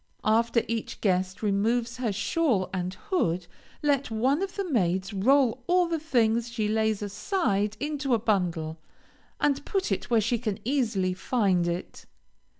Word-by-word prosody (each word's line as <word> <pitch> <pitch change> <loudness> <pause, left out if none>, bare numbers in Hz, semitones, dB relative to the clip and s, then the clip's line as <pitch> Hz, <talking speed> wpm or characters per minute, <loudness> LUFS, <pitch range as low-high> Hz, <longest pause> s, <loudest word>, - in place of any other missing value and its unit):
After 230 +2 +3
each 230 -1 -3
guest 185 0 0
removes 230 +4 +1
her 245 -4 -1
shawl 200 - 0
and 180 -1 -2 0.2
hood, 180 - +1 0.4
let 280 -3 +1
one 255 +8 +1
of 390 -1 -3
the 395 -2 -2
maids 190 - 0
roll 250 +4 +3
all 360 0 +4
the 330 -1 -1
things 235 -6 +1
she 225 -3 -1
lays 220 -1 +1
aside 205 - -1
into 290 -3 0
a - - +2
bundle, 175 -7 -1 0.6
and 285 -1 +1
put 385 - -1
it 195 - -2
where 235 -2 +4
she 230 +2 0
can 215 -4 -2
easily 225 -9 +1
find 185 -4 +1
it. 175 +2 -5
220 Hz, 150 wpm, -27 LUFS, 195-265 Hz, 0.6 s, all